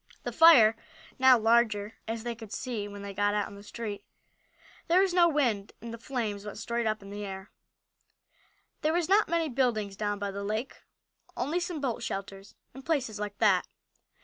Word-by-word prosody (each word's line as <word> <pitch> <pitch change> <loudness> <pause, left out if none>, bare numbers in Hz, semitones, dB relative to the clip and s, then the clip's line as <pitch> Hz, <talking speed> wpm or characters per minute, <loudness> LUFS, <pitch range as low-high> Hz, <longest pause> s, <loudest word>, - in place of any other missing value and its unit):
The - - -3
fire 250 -10 +7 0.4
was - - -32
now 260 -1 +7
larger, 225 -2 +2
as 225 0 -4
they 240 0 -3
could 225 -2 -11
see 225 -5 -4
when 205 0 -9
they 200 0 -6
got 205 +1 +1
out 205 -1 0
in - - -12
the 200 - -11
street. 205 -1 -6 0.8
There 345 +2 +4
was 385 -2 +1
no 345 -1 +5
wind 240 -10 0
and 230 +1 -8
the 230 - -8
flames 225 -5 -3
went 210 -1 -7
straight 235 +1 -2
up 215 -1 -2
in 200 - -10
the 205 0 -6
air. 190 0 -7 1.3
There 310 0 +1
were 350 +1 +2
not 405 0 +4
many 335 -1 +1
buildings 235 -7 0
down 205 0 -2
by 200 0 -3
the 200 +1 -5
lake, 215 +5 -3 0.6
only 295 +8 0
some 350 -2 -4
boat 255 -5 -2
shelters 195 0 -6 0.2
and 265 +2 -11
places 260 -9 -1
like 205 -1 -5
that. 195 -5 +3
225 Hz, 195 wpm, -29 LUFS, 205-260 Hz, 1.3 s, fire